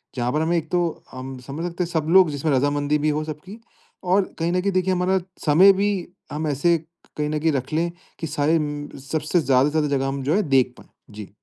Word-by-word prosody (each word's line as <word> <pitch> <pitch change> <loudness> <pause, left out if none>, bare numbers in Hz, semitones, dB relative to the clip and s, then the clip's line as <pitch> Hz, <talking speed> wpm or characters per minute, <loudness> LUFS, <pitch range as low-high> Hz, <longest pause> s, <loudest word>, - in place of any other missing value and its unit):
जहाँ 125 -1 -1
पर 150 - +1
हमें, 170 +2 +1
एक 160 -1 -4
तो 175 -2 -1
हम 130 0 -7
समझ 150 +5 -4
सकते 175 +1 -2
हैं 170 - -5
सब 160 -2 -1
लोग 185 -1 +6
जिसमें 145 +2 -1
रज़ामंदी 145 +2 +1
भी - - +4
हो 150 +1 -1
सबकी 155 +8 -8 0.4
और 185 +1 +1
कहीं 165 +1 0
न 180 0 +1
कहीं 200 - 0
देखिए 185 0 +1
हमारा 185 +1 +1 0.3
समय 175 +6 +7
भी, 200 +2 +1 0.4
हम 155 +1 -2
ऐसे 160 +4 +2 0.4
कहीं 150 0 -1
न 155 0 -1
कहीं 160 +1 +2
रख 135 +1 -3
लें, 170 +2 0 0.3
कि 160 - -3
सारे 150 +2 +1
म 145 -1 -4 0.2
सबसे 155 +2 +1
ज़्यादा 135 -1 +3
से - - -9
ज़्यादा 155 -1 +1
जगह 135 0 -1
हम 135 0 -3
जो 145 +6 +1
है 210 - +3
देख 130 -2 +3
पाएँ? - - -17 0.2
जी। 105 -1 -9
155 Hz, 235 wpm, -23 LUFS, 145-175 Hz, 0.4 s, समय